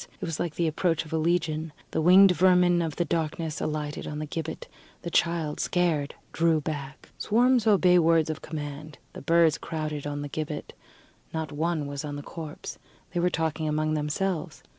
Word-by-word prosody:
It - - -4
was 165 -2 -4
like 170 -3 -2
the 170 - 0
approach 165 +1 0
of 155 - -9
a - - +2
Legion. 160 -2 0 0.2
The - - 0
winged 185 +3 +7
vermin 180 -1 +4
of 160 -3 -2
the 175 - 0
darkness 160 -1 -2
alighted 150 -1 -3
on 150 - -5
the 155 - -3
gibbet; 160 +1 -5 0.4
the 170 - -4
child, 165 -3 +1
scared, 165 -5 0 0.2
drew 165 -1 +3
back. 145 -2 -6
Swarms 245 +1 +3
obey 180 -4 +5
words 165 -1 +3
of 155 - -6
command: 150 -1 -7 0.2
the - - -8
birds 165 +1 +3
crowded 155 -2 -4
on 145 0 -3
the - - -4
gibbet; 150 +1 -5 0.6
not 160 -2 -3
one 155 0 -1
was 140 0 -5
on 145 -1 -5
the 145 - -6
corpse. 155 -1 -8 0.3
They 175 - 0
were 180 +1 +3
talking 160 -2 -1
among 155 +1 0
themselves. 155 +4 -2
160 Hz, 185 wpm, -27 LUFS, 150-170 Hz, 0.6 s, winged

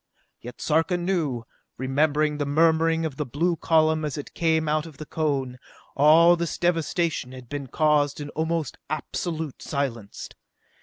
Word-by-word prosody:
Yet, 120 +1 -10
Sarka 165 +3 +1
knew, 170 -9 -1 0.3
remembering 150 +3 +1
the 145 - 0
murmuring 160 +2 +3
of 145 -4 -5
the 150 - -1
blue 170 +8 0
column 160 -1 +2
as 150 -2 -3
it 145 - -7
came 160 -1 +1
out 155 +1 0
of 155 -4 -13
the 155 - -7
cone, 135 -6 -2 0.4
all 160 +4 +6
this 170 -1 -3
devastation 165 -5 0
had 130 -1 -11
been 145 -2 -5
caused 150 0 +2
in 145 0 -6
almost 160 +1 -2
absolute 155 0 -4
silence. 120 -8 -4
155 Hz, 150 wpm, -25 LUFS, 140-165 Hz, 0.4 s, all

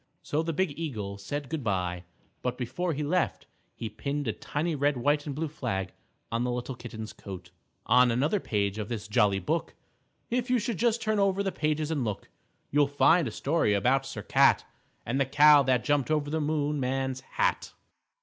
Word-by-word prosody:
So 150 - 0
the 165 0 -2
big 175 +1 0
eagle 105 -11 -4
said 145 +8 -4
good 160 -2 -4
by, 90 -4 -1 0.4
but 125 0 -2
before 135 +8 -2
he 150 +1 -2
left, 175 +5 0 0.3
he 115 - -5
pinned 140 +6 -3
a 110 - 0
tiny 150 +9 -2
red, 145 -1 +1
white 145 +4 +1
and 140 - -3
blue 160 +2 -2
flag 95 - -3 0.4
on 115 +1 0
the 125 - -1
little 125 +2 -3
Kitten's 115 -2 -8
coat. 95 -3 -9 0.4
_On 125 +1 +5
another 145 - +1
page 100 - -1
of 105 - -4
this 110 -3 -4
jolly 105 -3 +3
book, 95 - -2 0.6
If 250 +1 0
you 250 - +4
just 235 +1 0
turn 215 -1 +1
over 195 0 +2
the 195 - -1
pages 155 -1 -1
and 145 -5 0
look, 105 -4 -4 0.4
You'll 145 0 +4
find 155 +3 +4
a - - -4
story 140 -5 +1
about 130 +6 +2
Sir - - -6
Cat - - +4 0.4
And 130 +4 0
the - - +3
Cow 145 +1 +7
that 130 -2 +2
jumped 145 -2 +1
over 150 -2 0
the 160 0 0
Moon 150 -1 0
Man's 130 0 -1 0.2
Hat. - - +1
140 Hz, 190 wpm, -28 LUFS, 115-155 Hz, 0.6 s, Cow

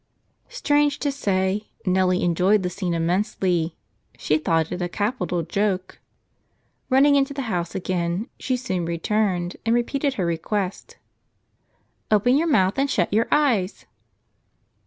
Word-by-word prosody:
Strange 295 -11 +1
to 285 - -1
say, 200 -5 -1 0.2
Nellie 185 -1 +2
enjoyed 185 +4 +2
the 180 - -2
scene 180 -3 -2
immensely; 175 -1 0 0.4
she 155 +1 +1
thought 160 0 0
it 180 - -4
a 175 - -1
capital 185 -4 -1
joke. 190 +2 -2 0.9
Running 275 +2 +5
into 280 0 +1
the 275 - -3
house 170 -1 -3
again, 180 +2 -2
she 255 - -1
soon 190 -9 -2
returned 175 +1 -1
and 230 +1 +2
repeated 275 +3 0
her 185 - -1
request: 180 +3 -3 1.1
"Open 215 +4 +4
your 325 +4 +2
mouth 195 - +2
and 280 +1 +1
shut 190 -7 0
your 225 +2 +2
eyes." 230 -11 +1
190 Hz, 135 wpm, -23 LUFS, 175-250 Hz, 1.1 s, Running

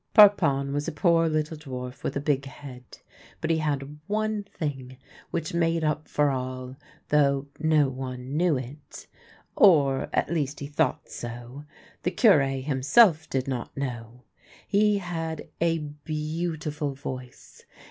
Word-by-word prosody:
Parpon 160 -10 +6
was 145 +1 -2
a - - -1
poor 165 +2 +3
little 155 0 -1
dwarf 130 -3 -7
with - - -3
a - - 0
big 140 -1 0
head, 130 -2 -11 0.4
but 160 - -1
he 160 - +2
had 145 -1 -2
one 215 0 0
thing 135 -8 -5 0.3
which 165 -1 -3
made 165 -1 +1
up 150 0 -1
for 145 -1 +2
all, 130 0 -4 0.3
though 140 -2 +3
no 155 -2 +3
one 130 0 -5
knew 165 -2 +3
it 135 +4 -9 0.3
— - - -22 0.2
or, 140 -8 +5
at - - 0
least, 145 -3 -1
he 140 - -5
thought 145 -1 0
so. 120 +4 -8 0.4
The - - 0
Cure 185 - +5 0.2
himself 155 - +4
did 130 -1 -1
not 130 -1 -4
know. 125 -2 -5 0.4
He 210 0 +3
had 165 -4 -4
a 165 -1 +3
beautiful 150 0 -4
voice. 130 -2 -9
145 Hz, 145 wpm, -26 LUFS, 135-165 Hz, 0.4 s, Parpon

